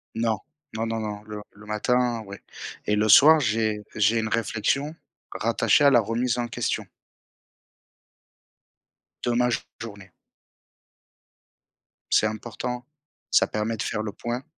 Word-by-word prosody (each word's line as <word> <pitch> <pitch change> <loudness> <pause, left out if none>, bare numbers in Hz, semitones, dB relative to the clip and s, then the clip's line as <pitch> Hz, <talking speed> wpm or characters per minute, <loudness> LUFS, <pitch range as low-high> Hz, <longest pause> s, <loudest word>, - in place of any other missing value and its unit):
Non. 115 -2 0 0.3
Non, 110 +1 -2
non, 115 0 -2
non, 105 -1 -5
le 105 -1 -7
le 105 +1 -16
matin, 120 +2 0
oui. 100 +1 -8 0.5
Et 105 - +1
le 105 +1 +1
soir, 155 +8 +8
j'ai 110 -3 0
j'ai 110 +2 +3
une 110 0 -2
réflexion 115 +7 -1 0.4
rattachée - - +2
à 140 - +8
la 125 -3 +6
remise 120 +3 -1
en 120 -1 -1
question - - -2 2.4
de 120 -1 0
ma 125 0 +3 0.3
journée. 100 -4 -9 2.0
C'est 110 - +5
important, 120 +3 -5 0.5
ça - - +4
permet 110 +1 -2
de - - -2
faire 105 - -2
le 105 - -4
point. 120 +4 -4
115 Hz, 130 wpm, -25 LUFS, 105-120 Hz, 2.4 s, soir